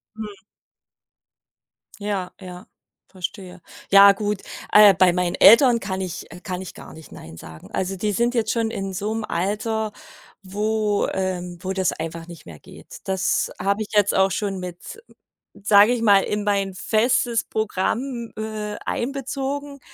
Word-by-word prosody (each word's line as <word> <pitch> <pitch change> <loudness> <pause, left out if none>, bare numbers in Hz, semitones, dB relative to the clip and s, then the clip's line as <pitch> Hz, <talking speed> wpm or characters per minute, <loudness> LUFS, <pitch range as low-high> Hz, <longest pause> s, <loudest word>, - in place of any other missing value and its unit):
Mhm. 210 -3 -9 1.6
Ja, 200 -3 -3
ja, 180 -2 -10 0.4
verstehe. 185 -1 -7 0.3
Ja 200 0 +9
gut, 205 0 -3 0.3
äh, 210 -2 +8
bei 180 0 +4
meinen 180 -1 -1
Eltern 235 +2 +7
kann 190 -2 -4
ich 175 -4 -6
äh, 175 - -10
kann 185 -1 -5
ich 185 - -8
gar - - -12
nicht 160 -1 -14
Nein 80 +1 -11
sagen. 80 0 -12
Also, 190 +1 -2
die 210 +3 -1
sind 235 +5 0
jetzt 225 -3 0
schon 230 -1 -1
in 195 -2 -4
so 205 +4 -3
'nem 225 -1 -3
Alter, 215 +4 -2 0.5
wo, 210 +1 -1
ähm 180 -2 -3
wo 190 0 -3
das 190 -2 0
einfach 165 +1 -6
nicht 170 -2 -12
mehr 80 -3 -12
geht. - - -13
Das 190 -1 0
habe 200 +3 0
ich 210 - -5
jetzt 205 -1 +3
auch 190 0 +3
schon 195 0 -2
mit, 180 - -9 0.5
sage 205 +2 +5
ich 240 - -2
mal, 200 -3 +5
in 210 0 -2
mein 200 -2 0
festes 230 +3 +1
Programm, 230 +4 -3
äh, 215 -1 -5
einbezogen, 275 +2 -4
200 Hz, 155 wpm, -22 LUFS, 185-220 Hz, 1.6 s, Ja